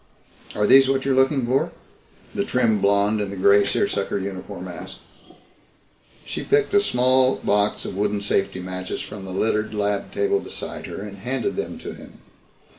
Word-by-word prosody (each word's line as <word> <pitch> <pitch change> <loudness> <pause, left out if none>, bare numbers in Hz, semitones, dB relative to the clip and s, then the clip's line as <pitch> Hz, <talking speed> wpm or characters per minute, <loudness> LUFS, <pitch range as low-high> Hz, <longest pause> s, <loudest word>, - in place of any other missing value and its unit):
"Are 105 - +1
these 135 +3 +7
what 135 -1 0
you're 135 - +2
looking 130 0 +3
for?" 130 +3 +1 0.6
the - - 0
trim 110 -5 +1
blonde 100 +2 +3
in 100 - -2
the 100 - -6
gray 100 +2 +5
seersucker 100 0 0
uniform 95 -1 -6
asked. - - -8 1.3
She - - -4
picked 425 -1 +1
a 405 - +6
small 130 - +3
box 105 0 0
of - - -5
wooden 105 +1 0
safety 95 -2 0
matches 95 0 -5
from 100 -2 -8
the 95 - -7
littered 105 +3 0
lab 100 -1 -1
table 405 -1 +1
beside - - -6
her - - -6
and - - -9
handed 400 - -2
them 410 - -4
to - - -7
him. - - -14
105 Hz, 170 wpm, -23 LUFS, 100-130 Hz, 1.3 s, these